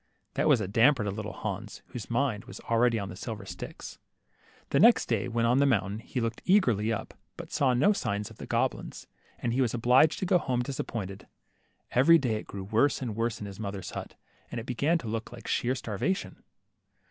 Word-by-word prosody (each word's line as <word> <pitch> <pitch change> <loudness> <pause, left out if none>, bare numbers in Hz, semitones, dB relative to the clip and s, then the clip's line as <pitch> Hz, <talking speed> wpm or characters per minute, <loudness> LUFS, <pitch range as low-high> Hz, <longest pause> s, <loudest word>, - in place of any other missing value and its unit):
That - - +1
was 145 -6 +5
a 105 - -2
damper 115 +4 +4
to 100 - -1
Little 105 +1 -5
Hans, 105 +1 -6
whose 120 -5 -7
mind 120 -3 0
was - - -10
already 115 0 +2
on 100 -2 -4
the 90 - -7
silver - - -6
sticks. - - -8 0.7
The - - +3
next - - +6
day, - - 0
when 115 -1 0
on 120 +3 +3
the 140 - +4
mountain, 105 -4 +1
he 125 - -4
looked 115 -1 -2
eagerly 120 - +3
up, 115 - -4 0.2
but - - -9
saw 130 -3 +2
no 175 +12 +4
signs 105 - -2
of - - -14
the - - -8
goblins, - - -2 0.3
and 115 - -2
was 120 -2 +1
obliged 125 +6 +4
to - - -2
go 180 -1 +4
home 125 -5 -1
disap 135 +1 -4
pointed. 100 -4 -6 0.6
Every 140 +7 +6
day 125 -7 0
it - - -8
grew 100 -1 -6
worse 110 +8 +2
and 120 -5 -4
worse 115 0 -1
in 105 - -6
his 100 0 -9
mother's 100 -3 -5
hut, - - -7 0.3
.and 120 - -4
it 115 - -7
began 140 +7 +1
to 125 - -7
look 110 +1 -4
like 115 -2 -10
sheer 125 +2 +1
starva 120 - -1
tion. - - -9
115 Hz, 215 wpm, -29 LUFS, 105-130 Hz, 0.7 s, next